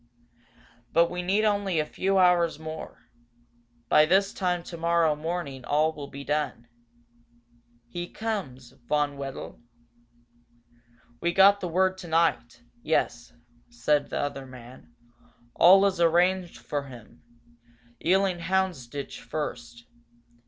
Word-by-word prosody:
But 170 +1 +4
we 180 0 -3
need 195 +4 +1
only 200 -4 0
a 155 - 0
few 195 +5 -1
hours 180 -3 +3
more. 160 0 -9 0.8
By 150 +5 +5
this 195 +3 +2
time 180 -2 -1
tomorrow 170 -2 +1
morning 155 -4 -5
all 155 +4 +1
will 145 -2 -8
be 140 0 -9
done. 145 -5 -2 1.2
He 175 +8 -6
comes, 145 - -5 0.2
Von 145 -1 0
Wedel?" 135 -3 -7 1.6
"We 170 - 0
got 195 +2 +6
the 180 - -4
word 185 +2 +1
tonight 160 -9 0 0.2
yes," 120 0 -1 0.4
said 140 +5 0
the - - -3
other 140 -2 -4
man. 125 -1 -13 0.6
"All 190 +3 +7
is 190 -3 0
arranged 175 +2 +2
for 145 -1 -4
him. 120 -2 -14 0.8
Ealing 190 0 +2
Houndsditch, 170 -7 -2
first. 120 -2 -6
165 Hz, 115 wpm, -26 LUFS, 140-180 Hz, 1.6 s, All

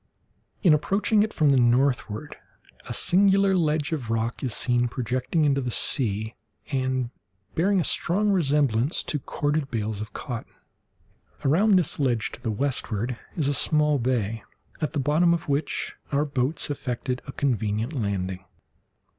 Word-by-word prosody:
In 175 -6 +6
approaching 200 +7 +2
it 215 +1 +1
from 155 -7 +2
the 135 - +4
northward, 120 0 +1 0.5
a - - -6
singular 195 +1 +4
ledge 155 -3 +1
of 135 -8 -3
rock 115 +1 -1
is 130 - -2
seen 120 +2 +1
projecting 130 +6 -1
into 140 -1 +2
the 125 - -2
sea, 110 -3 +1 0.4
and 130 -2 -1 0.4
bearing 195 +4 +2
a - - +1
strong 205 +7 +1
resemblance 145 - +2
to 150 - -1
corded 145 +2 -2
bales 110 -3 -3
of 110 - -6
cotton. 120 -3 -6 0.9
Around 195 +9 +4
this 180 -4 0
ledge 120 -6 0
to - - -10
the 115 - -2
westward 120 -1 -2 0.2
is 150 -4 0
a 145 - +1
small 150 +1 +2
bay, 115 -3 -1 0.4
at 155 - -1
the - - 0
bottom 160 +5 +3
of 170 - -6
which 140 +1 -1 0.2
our 145 +1 +2
boats 140 +2 -2
effected 125 -2 -3
a - - -5
convenient 115 -2 -1
landing. 95 -6 -2
135 Hz, 150 wpm, -25 LUFS, 120-155 Hz, 0.9 s, In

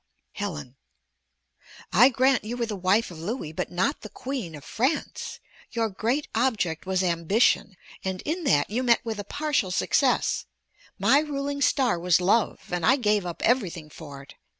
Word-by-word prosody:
Helen 150 - -6 1.2
I 240 +8 +7
grant 260 -1 +2
you 230 +3 -5
were 235 - 0
the 220 -2 -4
wife 190 +3 +1
of 165 - -10
Louis, 170 - -4
but - - -4
not 190 +12 0
the 215 - -8
Queen 235 - -5
of 145 - -11
France. 260 +8 -2 0.3
Your 230 -2 0
great 235 +9 -1
object 210 -9 0
was 190 0 +1
ambition, 185 +4 +2 0.3
and 190 -1 -3
in 335 +4 -2
that 145 - +2
you 240 +4 0
met 240 -2 +3
with 220 -2 -3
a - - -3
partial 290 -6 -1
success; 180 - +1 0.5
my 280 - +4
ruling 285 -1 -3
star 255 - +2
was 175 0 +3
love, 195 +1 0
and 175 -1 -1
I 265 - +5
gave 210 -7 +1
up 170 - -6
everything 180 -10 0
for 145 -4 -10
it. 140 - -15
210 Hz, 170 wpm, -26 LUFS, 175-255 Hz, 1.2 s, I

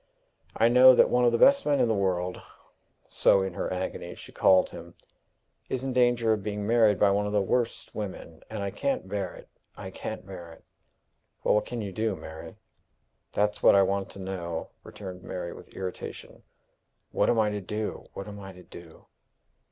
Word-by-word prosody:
I 115 - +5
know 125 +2 +8
that - - +5
one 125 0 +3
of 120 - +5
the 115 - +2
best 280 - +6
men 145 -1 +1
in - - +3
the 115 - +2
world" 90 -3 -1 0.7
so 95 - +3
in 95 -2 -4
her - - -3
agony 95 0 -4
she - - -12
called 95 -1 +4
him 85 +1 -11 0.7
"is 130 0 -2
in 135 -1 -2
danger 120 -2 +3
of 105 - -2
being 105 0 -4
married 110 -3 +4
by 100 -1 +5
one 105 +1 +1
of 105 - -4
the 105 - +3
worst 120 +4 -1
women; 95 -6 -7
and 110 -2 -4
I 100 - -3
can't 275 - -2
bear 95 -2 -3
it - - -13 0.3
I - - -7
can't - - -6
bear 90 -3 -9
it!" - - -19 0.8
"But - - +3
what 105 - +1
can 120 -2 -4
you 100 -2 -5
do, 110 +1 -1
Mary?" 80 -2 -10 0.8
"That's 105 0 0
what - - +6
I 100 - +6
want 100 0 -1
to - - -11
know," 85 -4 -5
returned 95 -3 -9
Mary, 90 -1 -6
with - - -13
irritation. 95 -1 -7 0.7
"What - - +2
am 120 - +2
I 105 -1 +2
to 105 0 -3
do? 105 +3 -4
What 100 - -6
am 105 0 -8
I 95 -1 -9
to 90 0 -14
do?" 85 -2 -14
100 Hz, 200 wpm, -27 LUFS, 95-110 Hz, 0.8 s, know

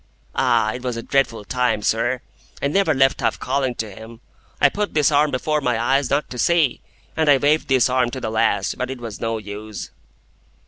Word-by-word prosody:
"Ah! 120 -4 +2
it 125 - -6
was 125 -2 -3
a 115 - -5
dreadful 115 -6 0
time, 125 -3 0
sir. 120 +4 0 0.4
I 140 - 0
never 195 +2 +2
left 135 0 +3
off - - 0
calling 130 -1 -1
to 110 -2 -5
him. 110 +3 -12 0.4
I 145 - +6
put 205 +6 -3
this 150 -1 +3
arm 150 +1 +3
before 150 +3 -1
my 125 -4 0
eyes 135 +3 +1
not 140 +2 0
to 125 - -6
see, 165 -5 +2 0.3
and 160 -2 +2
I 140 - +7
waved 150 +3 +2
this 130 -3 +4
arm 125 -1 +1
to 130 - -6
the 110 -3 -4
last; 110 - 0
but 125 - -2
it 130 - -5
was 115 -3 -8
no 115 0 -1
use." 105 0 -8
130 Hz, 210 wpm, -21 LUFS, 115-140 Hz, 0.4 s, I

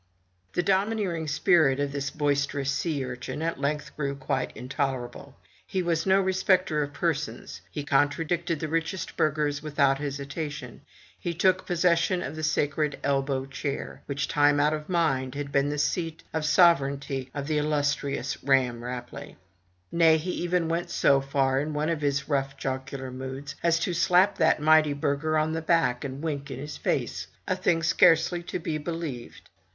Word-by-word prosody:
The 175 - +1
domineering 195 -4 0
spirit 150 -3 +3
of 145 -1 -1
this 140 -1 -2
boisterous 145 -1 0
sea 145 -2 -1
urchin 130 +4 -5
at 165 -4 -2
length 150 +1 -2
grew 140 -2 -2
quite 135 -1 -2
intolerable. 130 0 -4 0.3
He 190 -1 -1
was 165 0 0
no 190 +1 +5
respecter 185 -4 +2
of 145 -1 -3
persons; 150 0 -3
he 150 - -5
con 145 0 +3
tradicted 170 +2 -2
the 155 - -3
richest 165 +3 -2
burghers 150 -1 0
without 140 -2 +2
hesitation; 140 -1 -5 0.4
he 170 -1 -3
took 185 +2 +2
pos 175 -2 -2
session 175 +1 +3
of - - -5
the 155 - -5
sacred 150 -1 0
elbow 135 -1 0
chair, 135 +1 -5
which, 145 0 -2
time 145 0 +3
out 150 +1 +3
of 150 +1 -5
mind, 135 -7 0
had 140 -1 -4
been 140 +1 +2
the 150 - -2
seat 165 +2 -1
of 160 -1 -1
sovereignty 140 -5 +3
of 140 -1 -3
the 150 0 0
illustrious 145 -2 -1
Ramm 130 -4 +2
Rapelye. 125 +3 -7 0.6
Nay, 165 -1 +5
he 170 +4 -3
even 175 -1 0
went 170 +1 -2
so 140 -1 +3
far, 135 -1 +1
in 150 +2 -3
one 150 +2 0
of 165 -2 -1
his 140 -1 0
rough 135 -2 -1
jocular 130 0 -4
moods, 130 +2 -6
as 170 -1 +3
to 165 +2 -1
slap 180 +3 +3
that 160 -2 +4
mighty 155 -1 +5
burgher 145 +2 0
on 155 +1 +1
the 160 - -2
back, 160 -7 +2
and 140 +1 -6
wink 145 -3 -3
in - - -5
his 150 +3 -6
face, - - -2 0.2
a 185 - +1
thing 175 -3 +1
scarcely 165 +1 +4
to 175 - -4
be 160 -3 -3
believed. 155 -6 -6
150 Hz, 170 wpm, -27 LUFS, 140-165 Hz, 0.6 s, no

